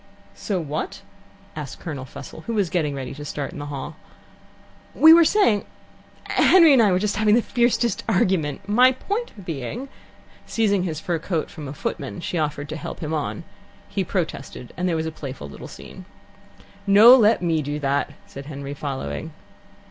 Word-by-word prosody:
"So 195 -4 -3
what?" 155 -1 -5 0.5
asked 150 -3 -7
Colonel 145 -6 -6
Fussell, 140 +4 -10
who 230 - -2
was 195 -6 0
getting 155 -6 0
ready 135 -2 -5
to 145 - -8
start 145 -1 -4
in - - -8
the 145 - -6
hall. 145 +2 -6 1.0
"We 320 +1 +9
were 335 0 +8
saying 315 - +3 0.6
Henry 335 -5 +5
and 260 - +6
I 210 -3 +4
were 180 - +3
just 205 +1 -1
having 215 0 +4
the 240 - +4
fiercest 240 -1 +1
argument, 185 -4 0
my 250 +5 +5
point 400 - -5
being 165 - -5 0.3
" - - -27
Seizing 205 -4 +1
his 160 -4 -3
fur 170 +1 -2
coat 165 -1 -3
from 150 -4 -8
a - - -6
footman, 145 +2 -5
she 170 0 -3
offered 150 -1 -2
to 155 - -4
help 150 - -7
him 155 -1 -3
on. 155 +3 -3 0.5
He 195 -1 -1
protested, 160 - -4
and 180 0 -1
there 170 - 0
was 160 0 -1
a 160 - -3
playful 135 - -8
little 70 - -10
scene. - - -12 0.8
"No, 215 +5 +9
let 220 -6 +4
me 165 -2 +1
do 145 +1 -3
that," 140 -1 -1
said 140 +1 -10
Henry, 140 -1 -6
following. 135 - -5
165 Hz, 180 wpm, -23 LUFS, 145-210 Hz, 1.0 s, We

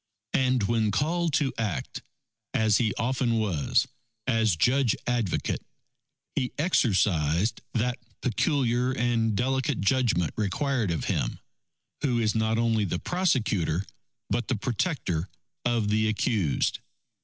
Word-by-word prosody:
And 130 -3 +2
when 110 0 +1
called 165 - 0
to 140 -4 +1
act, 105 -7 -3 0.5
as 110 -2 +4
he 115 -3 +2
often 120 0 0
was, 95 -10 +1 0.4
as 115 -6 +2
Judge 125 - +3
Advocate, 120 -7 -1 0.7
he 125 - -1
exercised 100 - +2
that 120 +2 0 0.2
peculiar 125 - +1
and 115 -3 +1
delicate 130 +3 0
judgment 105 - +2
required 115 +2 0
of 85 - -1
him, - - -1 0.6
who 130 -5 +1
is 110 -2 +1
not 110 0 +1
only 115 -2 +2
the 90 -3 -1
prosecutor 110 - 0 0.4
but 120 - -1
the 130 - 0
protector 105 - -1 0.4
of 115 -3 +1
the 110 +1 +2
accused. 105 - 0
115 Hz, 120 wpm, -27 LUFS, 105-130 Hz, 0.7 s, as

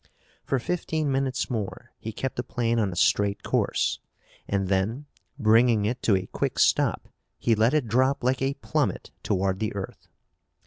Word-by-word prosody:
For 135 - 0
fifteen 155 +1 -1
minutes 135 -1 0
more 110 -6 -5
he 110 - -5
kept 130 +4 -4
the - - -1
plane 115 -1 -1
on 100 -4 +1
a - - -6
straight 100 +3 +2
course - - 0 0.5
and 100 -1 0
then, 100 +9 0 0.3
bringing 115 -2 +4
it 120 +4 -2
to 105 - +3
a 95 0 -1
quick - - -3
stop, - - +2 0.3
he 115 - +2
let 115 +6 +3
it 150 -5 +2
drop 130 +5 +2
like 130 +1 +1
a 135 +1 0
plummet - - -2
toward 95 0 0
the 110 0 -2
earth. 100 -1 -7
115 Hz, 170 wpm, -26 LUFS, 100-130 Hz, 0.5 s, bringing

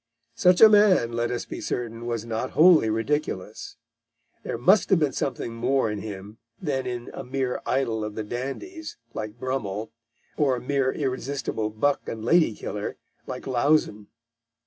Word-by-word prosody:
Such 180 +10 +4
a 220 - +12
man, 205 - +5
let 120 0 -1
us 120 - -3
be - - -7
certain, 120 -1 -4
was 115 -2 -2
not 115 +2 -3
wholly 160 -8 +7
ridiculous. 110 -3 -3 0.6
There - - -4
must 185 - +4
have 190 - +5
been 150 -4 +1
something 125 -4 -3
more 120 0 +1
in 105 - -4
him 105 +1 -8 0.2
than 135 -6 -2
in 120 -1 -5
a - - -6
mere 130 0 -2
idol 115 -5 0
of 105 0 -5
the 110 - -3
dandies, 140 - -6 0.2
like 110 +1 -6
Brummell, 110 -5 -3 0.5
or 140 -4 +3
a - - -4
mere 135 +1 0
irresistible 135 -5 -2
buck 140 +7 0
and 110 -1 -6
lady 160 -5 +4
killer, 105 0 -5 0.3
like - - -6
Lauzun. 130 -5 +1
125 Hz, 160 wpm, -25 LUFS, 110-145 Hz, 0.6 s, a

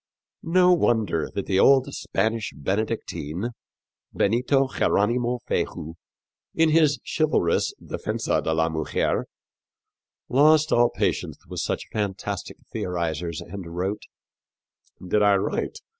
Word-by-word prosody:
No 180 +2 +4
wonder 110 - +1
that 100 - -2
the 95 -1 +1
old 135 +2 +5
Spanish 110 0 -1
Benedictine, 100 - -3 0.6
Benito 125 +6 +2
Jeronimo 120 0 +1
Feijoo, 80 +2 -2 0.6
in 165 0 +4
his 155 -2 +4
chivalrous 155 - +1
Defensa - - -2
de - - 0
la 80 0 +2
Mujer, 80 -1 -1 1.0
lost 155 +4 +4
all 120 0 +5
patience - - -2
with - - -5
such - - -2
fantastic 100 -2 -3 0.2
theorizers 85 -2 -3
and 85 -2 -8
wrote: 95 +4 -2 1.1
"Did 105 +3 +2
I 100 -1 +5
write 95 - -2
105 Hz, 110 wpm, -24 LUFS, 90-135 Hz, 1.1 s, old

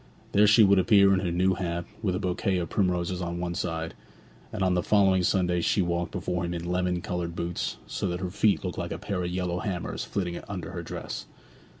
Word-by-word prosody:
Then 105 +1 +5
she 105 +2 +7
would 100 -1 +5
appear 100 0 +6
in 95 - +3
her 90 -3 -1
new 95 +2 +2
hat, 85 -2 -3 0.2
with 95 -5 0
a - - -1
bouquet 95 0 0
of 85 -2 -2
primroses 90 -2 0
on 85 -1 -3
one 85 0 -2
side; 80 -1 -3 0.6
and 95 - -2
on 95 -1 +3
the 90 - +2
following 95 -1 +4
Sunday 90 -1 +2
she 95 +3 +2
walked 85 0 -2
before 90 -1 -2
him 85 0 -2
in 85 0 -5
lemon 90 0 0
coloured 85 -2 -3
boots, 85 0 -3
so - - -3
that 90 0 -2
her 90 -1 -3
feet 105 +1 +2
looked 90 - -3
like 85 -1 -4
a - - -3
pair 100 -1 -3
of 90 - -2
yellow 90 -1 -2
hammers 90 -3 -3
flitting 90 -4 -3
under - - -5
her - - -5
dress. - - -6
90 Hz, 225 wpm, -27 LUFS, 85-95 Hz, 0.6 s, she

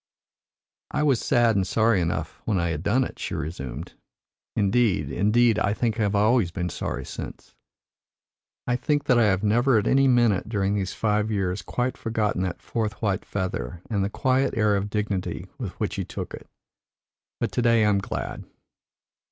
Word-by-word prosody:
"I 150 - 0
was 135 -6 +3
sad 120 -4 +3
and 95 -1 +1
sorry 110 -3 +3
enough 85 0 -3
when 105 -4 +1
I 85 0 0
had 75 -2 -2
done 115 +8 +2
it," - - -7
she - - -3
resumed. 75 -1 -5 0.6
"Indeed, 100 - +2
indeed, 105 - +3
I 100 0 +1
think 115 -1 -1
I - - +2
have 105 -1 +1
always 105 -1 +3
been 90 0 -3
sorry - - -4
since. - - -8 1.1
I 125 0 +1
think 145 +3 0
that 125 -4 +3
I 115 - +5
have 95 -1 +2
never 120 +4 +3
at 105 - +1
any 135 0 +4
minute 120 -6 +3
during 100 -3 0
these 95 -2 -2
five 105 0 +1
years 95 -2 -1
quite 125 +1 -2
forgotten 110 -4 -1
that 95 -2 -3
fourth 110 -2 -2
white 100 -3 0
feather 95 -2 -4
and 100 -3 +1
the 100 - -1
quiet 130 +4 +1
air 105 -2 +3
of 100 +1 -1
dignity 105 -3 -2
with - - -4
which - - -1
he - - -1
took - - -6
it. - - -10 0.9
But - - -1
to - - 0
day 115 -2 +4
I - - +4
am 100 -1 +3
glad." 100 - -5
105 Hz, 185 wpm, -25 LUFS, 95-120 Hz, 1.1 s, I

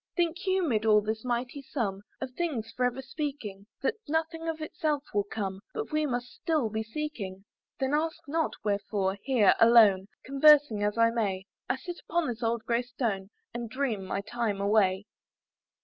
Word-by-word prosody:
"Think 350 +2 0
you, 375 -2 +2
mid 220 -5 +1
all 215 -1 +5
this 220 +1 -3
mighty 250 +3 -2
sum 210 -8 -3 0.2
"Of 265 -1 -4
things 255 -8 -3
for 250 - +1
ever 250 +2 -1
speaking, 265 -8 -5 0.2
"That - - +2
nothing 325 +1 -1
of 320 -1 -3
itself 310 -2 -1
will 205 -1 +1
come, 195 -2 -4
"But 440 -5 -4
we 305 0 +1
must 245 -1 -3
still 300 -9 0
be 220 +1 -1
seeking? 220 -6 -5 0.2
" - - -56
Then 265 +1 0
ask 320 +2 +1
not 320 +2 0
wherefore, 200 -1 -1
here, 250 -7 +4
alone, 220 -5 +7 0.2
"Conversing 275 -4 +5
as 210 +1 0
I 230 0 +5
may, 195 -5 -1 0.2
"I - - +2
sit 350 +6 -7
upon 340 0 +1
this 240 0 -4
old 230 -1 0
grey 235 0 +2
stone, 230 -6 -3 0.2
"And 235 -1 -4
dream 255 -6 -1
my 190 +1 -2
time 220 -2 -2
away." 200 -1 +2
240 Hz, 180 wpm, -29 LUFS, 210-295 Hz, 0.2 s, alone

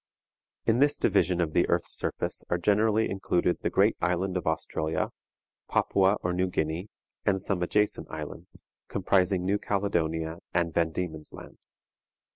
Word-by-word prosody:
In 115 +2 +3
this 145 +1 +4
division 90 -2 +2
of 80 -3 0
the - - +3
earth's - - 0
surface - - -3
are 85 - +2
generally 105 +4 +3
included 90 -2 0
the - - 0
great - - +3
island 90 +2 0
of 90 - -2
Australia, 80 0 -1 0.6
Papua 95 +1 +3
or 90 - 0
New 90 +1 +1
Guinea, 80 +1 -2 0.4
and 95 -1 +2
some 95 -1 -1
adjacent 105 +4 0
islands, - - -8 0.2
comprising 95 -1 +1
New 100 +2 +1
Caledonia 80 -5 -1 0.2
and 85 -2 +1
Van 80 0 +2
Diemen's 80 -2 -4
Land. - - -11
90 Hz, 145 wpm, -28 LUFS, 85-100 Hz, 0.6 s, this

